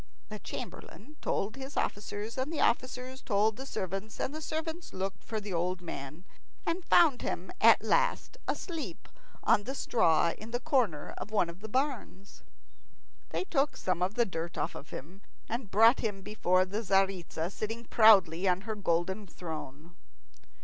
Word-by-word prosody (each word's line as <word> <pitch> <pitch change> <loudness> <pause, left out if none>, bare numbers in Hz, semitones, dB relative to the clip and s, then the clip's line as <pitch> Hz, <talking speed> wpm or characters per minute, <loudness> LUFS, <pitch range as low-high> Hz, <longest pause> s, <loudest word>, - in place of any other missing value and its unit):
The - - -6
chamberlain 300 +8 -8
told 205 +5 -1
his 270 +1 -7
officers, 205 +2 -2
and 265 +4 -2
the 320 - -3
officers 255 +2 0
told 210 0 +2
the 265 +4 -7
servants, 195 +2 -4
and 270 - -2
the 310 - -5
servants 320 +2 -4
looked 190 +1 -4
for 220 - -3
the 205 -2 -6
old 180 +2 0
man, 155 -1 -7 0.4
and 340 +3 -1
found 315 -7 +5
him - - -3
at - - +7
last - - +1
asleep 330 -4 -4 0.4
on 205 - +4
the 265 - -4
straw 170 - +3
in 215 - -10
the 245 +1 -1
corner 245 - 0
of - - -6
one 205 -6 +1
of 170 - -15
the 220 +2 -8
barns. 250 -6 -2 0.9
They - - -1
took 290 -6 0
some 185 -1 -1
of 190 +4 0
the 240 - +3
dirt 170 -2 -5
off 145 - -4
him, 180 +8 -9 0.3
and 235 -2 -3
brought 225 +6 +6
him 205 -4 -3
before 185 -3 +2
the 205 +4 -3
Tzaritza, 190 -4 +1
sitting 225 +3 -4
proudly 195 -6 +6
on 180 0 +2
her 220 +2 -4
golden 190 +1 -1
throne. 160 -1 -8
210 Hz, 165 wpm, -31 LUFS, 185-250 Hz, 0.9 s, at